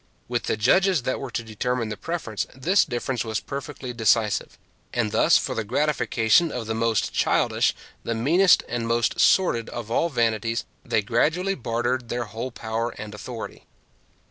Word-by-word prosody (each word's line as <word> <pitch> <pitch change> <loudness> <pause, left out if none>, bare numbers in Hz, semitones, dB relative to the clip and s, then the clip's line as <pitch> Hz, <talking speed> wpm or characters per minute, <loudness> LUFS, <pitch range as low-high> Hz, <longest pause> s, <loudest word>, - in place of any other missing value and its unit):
With 120 -1 -2
the - - 0
judges 180 - +3
that 130 - -1
were 135 - -5
to 115 - -3
determine 115 +1 -2
the 105 - -3
preference, 160 -8 -4
this 175 +10 +3
difference 120 +1 -2
was 110 -2 -2
perfectly 135 -2 -6
decisive; 110 -2 +1 0.3
and 115 -4 -1
thus, - - +5
for - - -2
the 115 - -2
gratification 145 +3 +2
of 125 -4 -4
the 110 - -2
most 115 -1 0
childish, - - +2 0.3
the 115 - -2
meanest, 165 +11 +4
and 120 0 -2
the - - -3
most 115 0 +1
sordid 120 -12 +3
of 115 -2 -6
all 170 +8 +2
vanities 115 -3 0 0.2
they 110 - 0
gradually 160 - +1
bartered 120 -3 -2
their 120 0 -1
whole 115 +3 -5
power 115 -1 -3
and 105 -1 -7
authority. 115 +2 -8
120 Hz, 170 wpm, -24 LUFS, 115-130 Hz, 0.3 s, thus